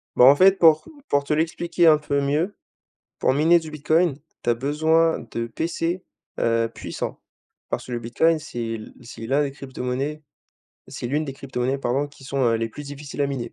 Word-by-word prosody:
Ben 125 - +7
en 135 +2 +9
fait, 190 +5 +6
pour 160 -2 +6 0.2
pour 145 0 +2
te 140 - -1
l'expliquer 170 +2 +1
un 155 -1 +7
peu 145 -1 -1
mieux, 150 +8 0 0.6
pour - - +2
miner 160 +5 +5
du 160 -2 -8
Bitcoin, 155 0 +1 0.2
tu 120 - +1
as - - +4
besoin 160 +6 +2
de 115 0 -3
PC, 165 +8 -2 0.4
heu, 115 0 +2
puissant, - - -5 0.5
parce - - -3
que 125 - -7
le 120 - -2
Bitcoin 155 +8 +2
c'est 120 -6 -4
le 110 - -11
c'est 115 -1 -9
l'un 140 +5 +2
des 140 -2 -2
cryptomonnaies 135 +2 -4 0.7
c'est - - -5
l'une 150 +5 0
des 135 - -5
cryptomonnaies 130 -1 -2
pardon 135 +2 -1
qui 140 -2 -17
sont, 140 +1 -3
heu, 115 -1 +3
les 115 0 -2
plus 130 +6 -9
difficiles 145 0 -8
à 140 - +3
miner 135 -4 -4
140 Hz, 195 wpm, -23 LUFS, 125-160 Hz, 0.7 s, en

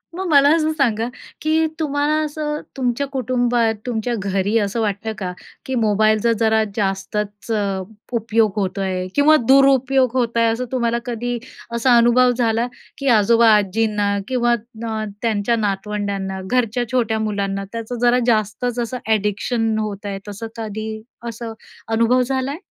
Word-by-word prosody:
मग 375 +1 -3
मला 285 -3 +6
असं 315 -1 +1
सांगा, 235 -7 +1 0.3
की 315 +1 +2
तुम्हाला 290 -1 0
असं, 300 0 -3 0.2
तुमच्या 255 +2 0
कुटुंबात, 245 -3 +1
तुमच्या 240 -1 -2
घरी 195 +2 0
असं 210 +2 -1
वाटतं 215 +1 -2
का, 185 -3 -3 0.3
की 265 - -2
मोबाईलचा 215 0 +3
जरा 220 -1 +3
जास्तच 205 +1 -3 0.6
उपयोग 225 -2 +2
होतो 195 0 -2
आहे 185 -1 -2
किंवा 295 +2 +6
दुरुपयोग 270 -1 +4
होत 235 -2 0
आहे, 230 - +4
असं 240 +3 -2
तुम्हाला 235 -2 0
कधी 245 0 -3 0.4
असा 240 +1 +4
अनुभव 245 +1 +5
झाला, 230 0 +1 0.3
की 275 - -4
आजोबा-आजींना 210 -1 +3
किंवा 240 -2 +2 0.3
ना 220 -1 -3 0.2
त्यांच्या 225 0 +1
नातवंड्यांना, 200 -2 -2
घरच्या 245 -1 +1
छोट्या 230 -3 +1
मुलांना, 200 -2 -2
त्याचं 230 +1 -5
जरा 245 +1 +4
जास्तच 230 +2 0
असं 240 +2 -2
अ‍ॅडिक्शन 220 +1 0
होत 210 -1 -4
आहे, 200 -1 -4
तसं 205 +3 -6
कधी 220 -1 -4 0.4
असं 230 0 -6 0.4
अनुभव 230 +3 +3
झालाय? 265 +3 -1
230 Hz, 135 wpm, -20 LUFS, 210-250 Hz, 0.6 s, मला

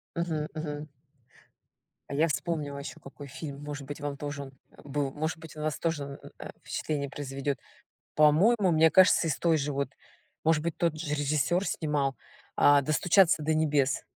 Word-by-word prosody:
Мгм. 165 -3 -1
Мгм. 150 -1 -5 1.2
А - - -3
я 160 +4 +3
вспомнила 150 -2 -2
еще 140 - -8
какой 140 +1 -10
фильм 140 +1 -7
может 145 -1 -6
быть 145 +2 -7
вам 145 -1 -3
тоже 145 0 -5
он 135 -1 -9 0.3
был, 145 -1 -2
может 155 +3 -3
быть 160 0 -11
на 150 - -6
вас 155 -1 -1
тоже 160 -3 -1
н 140 0 -8 0.2
э, - - -7
впечатление 145 -2 -3
произведет. 140 0 -4 0.6
По-моему, 185 +8 +5
мне 160 0 +5
кажется, 185 -1 +6
из 155 - 0
той 165 -2 +2
же 145 0 -2
вот, 140 0 -2 0.5
может 160 -1 +3
быть 170 -1 -2
тот 165 -2 0
же 150 -2 -2
режиссёр 150 +6 +1
снимал, 145 -4 -1 0.4
а, 145 0 +6
"Достучаться 165 +4 +3
до 155 +1 +1
небес". 150 -3 +1
150 Hz, 170 wpm, -29 LUFS, 140-160 Hz, 1.2 s, кажется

